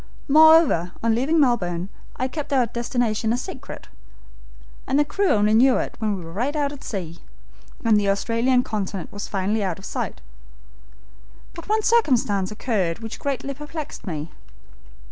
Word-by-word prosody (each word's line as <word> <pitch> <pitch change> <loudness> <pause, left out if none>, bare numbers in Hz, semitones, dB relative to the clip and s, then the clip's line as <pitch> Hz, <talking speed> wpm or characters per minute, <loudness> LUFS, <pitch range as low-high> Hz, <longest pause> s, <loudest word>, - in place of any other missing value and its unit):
Moreover, 310 - +6
on 230 -1 +3
leaving 275 +8 +2
Melbourne, 185 - +1 0.3
I 255 - -1
kept 295 +2 -6
our 260 -3 +3
destination 235 -1 -1
a 240 - +1
secret, 250 - -8 1.0
and 270 - +1
the 295 - +4
crew 395 +5 0
only 210 0 +3
knew 250 +3 +5
it - - -3
when 215 -3 -1
we 175 - -8
were 165 - -9
right 250 - -1
out 290 -2 0
at 285 - -10
sea, 170 -5 -5 0.7
and 220 -2 +5
the 200 -1 0
Australian 235 +5 +2
continent 200 -5 -4
was 205 0 -5
finally 205 +2 -1
out 185 -4 -2
of 195 - -11
sight. - - -4 1.3
But 335 +3 -10
one 435 0 +2
circumstance 245 - +2
occurred 205 -6 -1
which 225 -1 -8
greatly 275 -1 -3
perplexed 295 -2 -8
me." 155 -2 -4
230 Hz, 160 wpm, -23 LUFS, 200-280 Hz, 1.3 s, Moreover